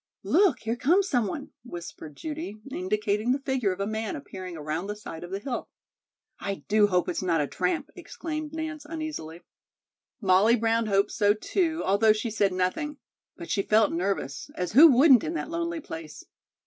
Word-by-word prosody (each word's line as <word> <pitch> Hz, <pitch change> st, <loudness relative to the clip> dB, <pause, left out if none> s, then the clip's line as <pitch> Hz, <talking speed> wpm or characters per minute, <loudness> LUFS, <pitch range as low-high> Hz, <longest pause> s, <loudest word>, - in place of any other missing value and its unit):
"Look, 385 Hz, -, +3 dB
here 225 Hz, +1 st, -1 dB
comes 350 Hz, +11 st, +3 dB
some 245 Hz, -, +1 dB
one," 280 Hz, +6 st, -6 dB
whispered 170 Hz, -, -9 dB
Judy, 300 Hz, -, -6 dB
indicating 210 Hz, +3 st, 0 dB
the 275 Hz, -, -1 dB
figure 265 Hz, -7 st, 0 dB
of 185 Hz, -, -5 dB
a 200 Hz, -, 0 dB
man 220 Hz, +4 st, -3 dB
appearing 185 Hz, -, -8 dB
around 155 Hz, +4 st, -3 dB
the 210 Hz, -, -3 dB
side 175 Hz, -6 st, -8 dB
of 175 Hz, -, -8 dB
the 195 Hz, -, -3 dB
hill. 245 Hz, +4 st, -5 dB, 0.7 s
"I 195 Hz, -1 st, -4 dB
do 210 Hz, 0 st, +4 dB
hope 180 Hz, -3 st, +1 dB
it's -, -, -2 dB
not 175 Hz, -3 st, +1 dB
a 145 Hz, -, +1 dB
tramp," 180 Hz, +5 st, -2 dB
exclaimed 310 Hz, -2 st, -6 dB
Nance 315 Hz, -1 st, -5 dB
uneasily. 300 Hz, -, -6 dB, 0.8 s
Molly 200 Hz, +3 st, +4 dB
Brown 225 Hz, -1 st, +1 dB
hoped 200 Hz, 0 st, +2 dB
so, 205 Hz, -1 st, +3 dB
too, 325 Hz, -, -1 dB
although 210 Hz, +3 st, +4 dB
she 220 Hz, +2 st, -3 dB
said 205 Hz, -2 st, +2 dB
nothing. 185 Hz, +12 st, -1 dB, 0.4 s
But 340 Hz, -, -7 dB
she 200 Hz, -, +2 dB
felt 215 Hz, +1 st, +3 dB
nervous, 170 Hz, -6 st, -2 dB
as 180 Hz, -1 st, -2 dB
who 290 Hz, +9 st, +9 dB
wouldn't 265 Hz, -3 st, +6 dB
in 330 Hz, -, -3 dB
that 330 Hz, -, -4 dB
lonely 335 Hz, 0 st, -2 dB
place? 160 Hz, -, -8 dB
215 Hz, 180 wpm, -27 LUFS, 185-295 Hz, 0.8 s, who